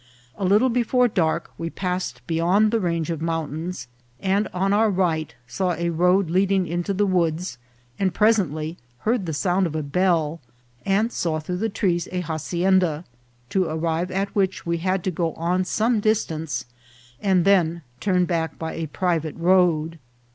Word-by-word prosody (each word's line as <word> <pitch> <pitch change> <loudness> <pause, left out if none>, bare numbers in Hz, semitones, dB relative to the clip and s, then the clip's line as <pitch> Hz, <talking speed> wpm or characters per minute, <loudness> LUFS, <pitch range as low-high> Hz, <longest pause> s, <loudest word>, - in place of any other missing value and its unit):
A 195 - -3
little 210 +7 +4
before 245 +1 +3
dark 170 -5 0
we 165 - -3
passed 180 +1 -3
beyond 180 +6 +2
the 230 - +2
range 170 -3 -1
of 160 -2 -4
mountains, 165 +1 -3 0.3
and 195 +2 +1
on 195 +2 0
our 220 +1 +4
right 170 -6 0
saw 180 +9 -1
a 170 0 -1
road 180 +3 +3
leading 190 +1 +2
into 175 +3 -2
the 200 +1 +1
woods, 170 -6 0 0.4
and 190 -1 +2
pres 220 +3 +4
ently 155 -1 -3 0.2
heard 220 -4 0
the - - -1
sound 180 +4 +1
of 160 - -6
a 155 - -1
bell, 165 0 +1 0.5
and 210 +4 +2
saw 160 -7 -1
through 180 +3 -4
the 225 +4 -1
trees 175 -4 0
a 180 -1 -1
hacienda, 175 +1 0 0.5
to 190 -2 +2
arrive 165 +2 -1
at 195 +1 -2
which 190 -2 0
we 170 0 -1
had 185 +1 0
to 185 - 0
go 165 -1 -1
on 180 +3 0
some 220 +4 +1
distance, 165 -10 -1 0.6
and 190 -3 +2
then 170 -4 +3 0.2
turn 180 -3 +2
back 165 -3 -2
by 160 0 -4
a 165 -1 -4
private 165 -1 -1
road. 170 -2 +2
180 Hz, 170 wpm, -23 LUFS, 165-195 Hz, 0.6 s, little